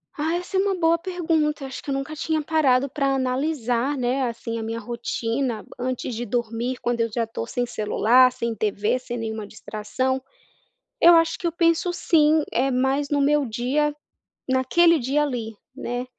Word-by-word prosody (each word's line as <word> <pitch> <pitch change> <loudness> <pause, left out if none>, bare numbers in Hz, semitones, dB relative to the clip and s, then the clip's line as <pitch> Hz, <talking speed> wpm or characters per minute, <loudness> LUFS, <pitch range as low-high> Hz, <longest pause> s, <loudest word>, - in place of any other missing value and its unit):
Ah, 315 +2 -1
essa 360 +2 -3
é - - +4
uma 390 0 +1
boa 335 -1 +3
pergunta, 325 -5 -1
acho 265 - -7
que - - -8
eu - - 0
nunca 275 +3 -4
tinha 315 +1 -1
parado 280 -4 +2
pra 275 -1 0
analisar, 260 0 0
né, 255 +2 0
assim, 230 0 -5
a 225 - -4
minha 225 +1 -4
rotina 235 +1 -3
antes 250 -1 -3
de 240 +2 -3
dormir 235 +2 -2
quando 240 -1 0
eu 230 - +1
já 230 +1 0
estou 220 - -5
sem 245 - -2
celular, 240 +3 +3
sem 235 -2 -3
TV, 210 +2 0
sem 245 -1 -6
nenhuma 220 -2 -4
distração. 240 +6 -3 0.8
Eu 345 +1 +9
acho 330 0 +3
que 350 - -8
eu - - 0
penso 335 +1 +2
sim, 310 -3 +3
eh, 265 +2 +1
mais 265 +3 +1
no 290 -1 +1
meu 290 0 +3
dia, 260 +6 0 0.5
naquele 320 +6 +4
dia 280 +4 +1
ali, 235 -6 -3 0.2
né. 245 +1 -4
260 Hz, 180 wpm, -23 LUFS, 235-300 Hz, 0.8 s, Eu